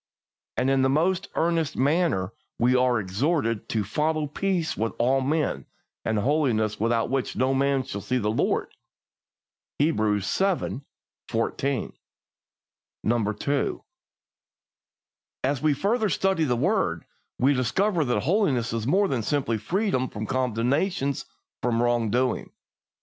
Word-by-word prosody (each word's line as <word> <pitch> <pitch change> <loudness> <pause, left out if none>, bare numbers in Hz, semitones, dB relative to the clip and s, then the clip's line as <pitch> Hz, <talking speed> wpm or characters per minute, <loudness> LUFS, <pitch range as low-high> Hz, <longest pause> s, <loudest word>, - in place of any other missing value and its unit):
And 135 - +2
in 135 -1 +3
the 130 - +3
most 170 +6 +1
earnest 165 -2 0
manner 140 - +1 0.2
we 125 +2 +3
are 125 -2 +3
exhorted 115 - -1
to 110 -2 0
"follow 150 +9 0
peace 175 +2 -1
with 115 +1 -1
all 130 +3 +2
men, 150 +2 -1 0.4
and 110 - 0
holiness, 115 -4 +1
without 115 +2 +1
which 135 -2 -1
no 130 +1 +2
man 135 0 +2
shall 110 -6 -6
see 130 +6 -1
the 105 -3 0
Lord" 110 - 0 1.1
(Hebrews 110 -9 +1
xii. 190 -8 0 0.5
14). 120 +3 -1 1.5
2. 140 -1 -1 1.6
As 135 0 0
we 155 -1 +3
further 215 - +1
study 190 -3 +1
the 125 -4 +1
word, 125 - 0 0.3
we 135 +3 +3
discover 170 - +1
that 120 -6 0
holiness 135 - +1
is 115 0 -2
more 195 +7 +3
than 130 -9 -1
simple 120 -1 0
freedom 170 - 0
from 110 0 -5
condemnation 130 - 0 0.5
for 125 - 0
wrong 120 -1 +1
doing. 125 +2 0
130 Hz, 130 wpm, -25 LUFS, 115-155 Hz, 1.6 s, in